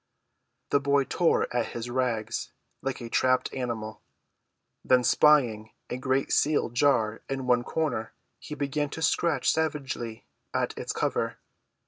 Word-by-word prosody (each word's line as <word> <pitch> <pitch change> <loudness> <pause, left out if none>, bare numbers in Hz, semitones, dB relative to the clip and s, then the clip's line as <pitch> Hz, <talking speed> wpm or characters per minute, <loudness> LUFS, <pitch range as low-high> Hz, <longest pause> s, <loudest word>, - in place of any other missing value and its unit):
The 140 - +4
boy 140 0 +2
tore 170 +5 +2
at 120 -2 -1
his 120 0 -4
rags 120 -3 -2 0.3
like 135 -1 -3
a 120 - -5
trapped 130 +1 +2
animal. 115 -4 -4 0.8
Then 125 -1 +4
spying 120 -7 +4 0.2
a 125 - -2
great 130 +1 0
sealed 145 -5 +2
jar 120 -5 +2
in 135 -1 -3
one 125 -1 +3
corner 145 -7 -2 0.3
he 150 - -7
began 145 0 -1
to 160 - -3
scratch 160 -3 +2
savagely 135 -8 -3 0.3
at - - 0
its - - -4
cover. - - -1
130 Hz, 135 wpm, -27 LUFS, 120-145 Hz, 0.8 s, The